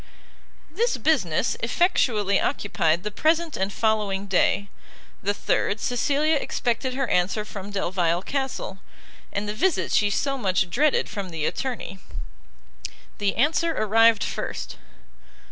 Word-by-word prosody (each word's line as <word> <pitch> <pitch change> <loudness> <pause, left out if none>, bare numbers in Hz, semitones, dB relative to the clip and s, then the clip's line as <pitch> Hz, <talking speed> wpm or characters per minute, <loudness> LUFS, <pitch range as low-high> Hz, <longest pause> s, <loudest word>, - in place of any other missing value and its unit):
This 450 - 0
business 225 - +1
effectually 230 - +2
occupied 170 -4 0
the 210 - -3
present 320 +6 +1
and 190 +1 -1
following 205 -2 0
day; 200 +1 +2 0.5
the 200 - +1
third, 205 +1 0
Cecilia 290 +5 +1
expected 255 -1 -1
her 270 -1 0
answer 195 +3 +1
from 200 -2 -7
Delvile 180 -3 0
Castle, 265 -8 -3 0.5
and 200 +1 -3
the 210 - -2
visit 335 - +1
she 205 - +3
so 275 +6 -1
much 185 -4 +1
dreaded 295 - +2
from 200 -3 -5
the 160 -3 -3
attorney. 245 -7 -3 1.2
The 200 -1 0
answer 320 +5 +2
arrived 225 0 +4
first. - - -4
215 Hz, 125 wpm, -24 LUFS, 195-275 Hz, 1.2 s, arrived